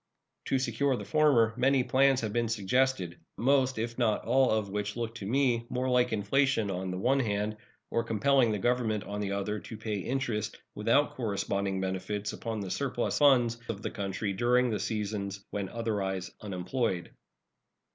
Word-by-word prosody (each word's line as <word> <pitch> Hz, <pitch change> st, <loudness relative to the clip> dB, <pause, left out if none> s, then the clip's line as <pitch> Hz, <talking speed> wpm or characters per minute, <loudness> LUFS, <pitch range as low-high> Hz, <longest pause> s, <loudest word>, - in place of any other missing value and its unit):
To 135 Hz, -, +1 dB
secure 135 Hz, +1 st, +1 dB
the -, -, -6 dB
former 140 Hz, -8 st, +4 dB
many 130 Hz, +1 st, +3 dB
plans 130 Hz, +1 st, +3 dB
have 110 Hz, -2 st, -3 dB
been 120 Hz, 0 st, +1 dB
suggested, 110 Hz, -4 st, 0 dB, 0.2 s
most, 130 Hz, 0 st, +2 dB
if 115 Hz, +2 st, -3 dB
not 110 Hz, -3 st, +1 dB
all, 135 Hz, 0 st, +4 dB
of 110 Hz, -2 st, +1 dB
which 105 Hz, +2 st, -3 dB
look 115 Hz, -1 st, -3 dB
to 105 Hz, -4 st, -7 dB
me 120 Hz, -1 st, +1 dB
more 125 Hz, +1 st, -1 dB
like 125 Hz, -1 st, +3 dB
inflation 110 Hz, +1 st, +1 dB
on 95 Hz, 0 st, -3 dB
the 90 Hz, -, -3 dB
one 130 Hz, +8 st, +2 dB
hand, 105 Hz, -2 st, -1 dB, 0.3 s
or 115 Hz, -, +1 dB
compelling 120 Hz, +2 st, +3 dB
the 105 Hz, -, 0 dB
Government, 115 Hz, -1 st, 0 dB
on 105 Hz, +1 st, -5 dB
the 100 Hz, -1 st, -2 dB
other, 100 Hz, +2 st, -2 dB
to 110 Hz, +4 st, -9 dB
pay 110 Hz, -2 st, -3 dB
interest, 115 Hz, -2 st, -2 dB, 0.2 s
without 115 Hz, +8 st, +2 dB
corresponding 100 Hz, -4 st, -1 dB
benefits, 95 Hz, +2 st, -3 dB
upon 115 Hz, -2 st, -4 dB
the 95 Hz, -2 st, -5 dB
surplus 135 Hz, -3 st, -1 dB
funds 120 Hz, -5 st, +4 dB
of 105 Hz, -2 st, -4 dB
the -, -, -3 dB
country 100 Hz, 0 st, -3 dB
during 125 Hz, +4 st, +2 dB
the 105 Hz, -, -1 dB
seasons 100 Hz, -2 st, -3 dB
when 100 Hz, -2 st, -3 dB
otherwise 100 Hz, -5 st, -2 dB
unemployed. 95 Hz, 0 st, -2 dB
115 Hz, 170 wpm, -30 LUFS, 100-125 Hz, 0.3 s, former